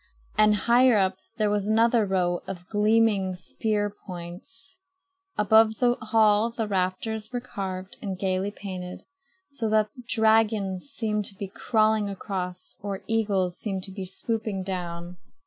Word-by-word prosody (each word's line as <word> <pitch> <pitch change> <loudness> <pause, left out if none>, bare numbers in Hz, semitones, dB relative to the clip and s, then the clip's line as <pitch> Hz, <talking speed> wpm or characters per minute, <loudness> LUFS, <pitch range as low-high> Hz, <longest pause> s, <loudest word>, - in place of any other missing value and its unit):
And 215 0 +5
higher 240 +2 +4
up 190 -1 +1 0.2
there 210 -2 +2
was 205 -1 0
another 225 0 +3
row 180 -2 +1
of 180 -2 -7
gleaming 210 -3 +2
spear 205 +3 -1
points. 185 - -10 0.6
Above 220 +1 +5
the 245 -1 +3
hall 220 -1 +3
the 230 -2 -3
rafters 210 +3 -2
were 245 - -2
carved 190 -6 -6
and 195 -3 -4
gaily 190 +1 0
painted, 185 -3 -7 0.5
so 260 -6 -3
that 215 -1 +2 0.2
dragons 220 -4 +2
seemed 220 -7 -1
to 195 - -2
be 200 0 -5
crawling 215 +1 +1
across, 185 -2 -5
or 200 -1 -4
eagles 200 -5 0
seemed 195 -4 -3
to 195 - -5
be 190 0 -5
swooping 215 0 -2
down. 175 -2 -5
205 Hz, 140 wpm, -26 LUFS, 190-220 Hz, 0.6 s, And